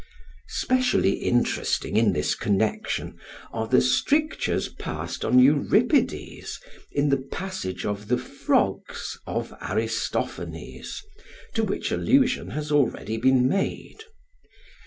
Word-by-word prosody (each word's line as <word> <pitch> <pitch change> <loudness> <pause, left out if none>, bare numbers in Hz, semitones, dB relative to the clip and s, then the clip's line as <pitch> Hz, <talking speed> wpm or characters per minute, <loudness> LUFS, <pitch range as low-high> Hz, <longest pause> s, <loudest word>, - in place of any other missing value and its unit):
Specially 255 - +2
interesting 120 -3 0
in 110 -1 +4
this 75 -4 0
connection 110 - -1 0.3
are - - -2
the - - +5
strictures 305 +2 +1
passed - - -5
on 125 - +3
Euripides 155 - +2 0.3
in 145 0 +1
the 140 -1 +3
passage 180 - -4
of 105 0 -3
the 125 +2 +2
"Frogs" 140 - -1
of - - -3
Aristophanes - - -3 0.5
to 225 - +1
which 200 -2 -2
allusion 260 -2 +2
has 150 0 -4
already 130 -6 +1
been 130 +1 +4
made. 195 - -2
140 Hz, 105 wpm, -25 LUFS, -, 0.5 s, the